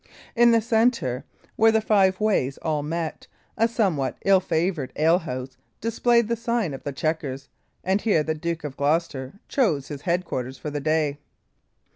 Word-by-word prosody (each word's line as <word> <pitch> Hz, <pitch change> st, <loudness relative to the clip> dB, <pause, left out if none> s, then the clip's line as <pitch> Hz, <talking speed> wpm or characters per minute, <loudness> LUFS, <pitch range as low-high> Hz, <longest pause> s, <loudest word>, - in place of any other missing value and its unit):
In 240 Hz, 0 st, +6 dB
the 230 Hz, -1 st, +4 dB
centre, 225 Hz, -, +1 dB, 0.3 s
where 225 Hz, 0 st, +6 dB
the 220 Hz, -, +3 dB
five 195 Hz, -3 st, +3 dB
ways 190 Hz, -11 st, +1 dB
all 155 Hz, -2 st, 0 dB
met, 160 Hz, +2 st, -4 dB, 0.3 s
a 225 Hz, -, +3 dB
somewhat 190 Hz, -, 0 dB
ill 195 Hz, -1 st, +6 dB
favoured 165 Hz, -5 st, -1 dB
alehouse 150 Hz, -6 st, 0 dB, 0.2 s
displayed 235 Hz, +1 st, +2 dB
the 235 Hz, -, 0 dB
sign 230 Hz, -7 st, -1 dB
of 135 Hz, -, -7 dB
the 145 Hz, -, -4 dB
Chequers; 140 Hz, -3 st, -3 dB, 0.3 s
and 190 Hz, +2 st, +1 dB
here 200 Hz, -9 st, +2 dB
the 160 Hz, -, -1 dB
Duke 165 Hz, +1 st, -4 dB
of 145 Hz, -3 st, -5 dB
Gloucester 145 Hz, +1 st, -1 dB
chose 160 Hz, -, +1 dB
his 145 Hz, -2 st, -6 dB
headquarters 145 Hz, -7 st, -2 dB
for 150 Hz, -, -6 dB
the 145 Hz, -, -2 dB
day. 155 Hz, -1 st, 0 dB
165 Hz, 160 wpm, -24 LUFS, 145-215 Hz, 0.3 s, In